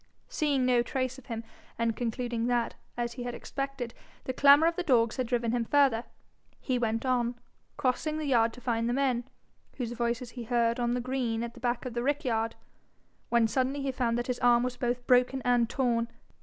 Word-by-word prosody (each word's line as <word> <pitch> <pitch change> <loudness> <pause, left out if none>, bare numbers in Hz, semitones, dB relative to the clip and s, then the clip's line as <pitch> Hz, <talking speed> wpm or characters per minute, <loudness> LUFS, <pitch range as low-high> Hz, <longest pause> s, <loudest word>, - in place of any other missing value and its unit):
Seeing 295 - +1
no 250 -1 +4
trace 255 +1 -2
of 265 - -19
him, 230 -1 -4 0.3
and 230 -1 0
concluding 240 0 -2
that, 240 -1 +1 0.2
as 240 0 -2
he 245 - -7
had 245 0 -4
expected, 275 -4 -4 0.3
the 260 - -3
clamour 285 +4 +7
of 335 - +1
the 360 - -1
dogs 240 -8 +2
had 255 -2 -1
driven 235 -1 0
him 240 -1 +1
further, 260 -2 +3 0.5
he 255 -2 -1
went 225 +1 -1
on, 245 -2 +1 0.4
crossing 295 +3 0
the 310 - -3
yard 235 -4 +3
to 250 - -12
find 230 -1 0
the - - +1
men, 255 -3 +1 0.5
whose 240 -3 -3
voices 240 0 -2
he 240 -2 -7
heard 235 0 +1
on 240 0 +1
the 250 - -1
green 240 -3 -1
at 235 0 -5
the 245 - -13
back 240 +1 -1
of 250 - -4
the 240 - -1
rick 290 +3 0
yard, 225 -2 0 0.7
when 235 -1 +4
suddenly 265 +4 0
he 275 - 0
found 240 -2 0
that 240 - -1
his 250 -1 -2
arm 240 -1 +4
was 250 0 -2
both 245 -1 -2
broken 250 +1 +4
and 240 -2 +3
torn. 235 -3 +1
245 Hz, 210 wpm, -29 LUFS, 235-260 Hz, 0.7 s, clamour